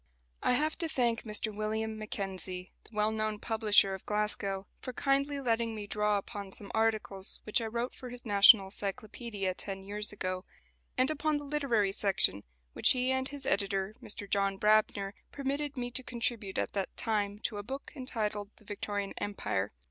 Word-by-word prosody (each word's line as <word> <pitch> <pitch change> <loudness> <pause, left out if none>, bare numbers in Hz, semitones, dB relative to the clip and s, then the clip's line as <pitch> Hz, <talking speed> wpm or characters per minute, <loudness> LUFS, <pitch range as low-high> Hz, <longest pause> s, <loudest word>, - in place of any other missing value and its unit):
I - - +3
have 305 +4 0
to 330 - 0
thank 240 -5 +1
Mr 215 0 +2
William 220 +1 -1
Mackenzie, 190 -3 -4
the - - -16
well 210 +1 +2
known 215 -1 -1
publisher 210 -3 +4
of 190 - -6
Glasgow, 205 -2 -1 0.2
for 255 - -5
kindly 280 +2 +1
letting 230 -3 0
me 210 -1 -5
draw 210 0 +1
upon 200 -1 -6
some 200 - -3
articles 215 -3 0
which 215 +3 +1
I 225 - -2
wrote 235 +3 -2
for 250 - -8
his 245 0 -8
"National 200 -1 +7
Cyclopædia" 205 0 -3
ten 195 0 -4
years 210 +2 0
ago, 185 -2 -3 0.5
and 255 +3 +4
upon 310 0 +1
the 290 - -5
literary 275 -9 +1
section, 190 - +3 0.3
which - - +6
he 255 0 +1
and 260 0 +1
his 285 -1 -5
editor, 195 -4 0
Mr 205 -1 -4
John 195 0 +1
Brabner, 210 -1 +3 0.2
permitted 280 +1 -2
me 245 -1 -2
to 255 +2 -2
contribute 235 -5 -2
at - - 0
that 195 -2 -2
time 205 -3 0
to 210 - -2
a - - -5
book 270 +6 -6
entitled 215 -6 -2
"The 215 - -22
Victorian 205 -1 -3
Empire." 200 - -1
215 Hz, 175 wpm, -32 LUFS, 200-245 Hz, 0.5 s, National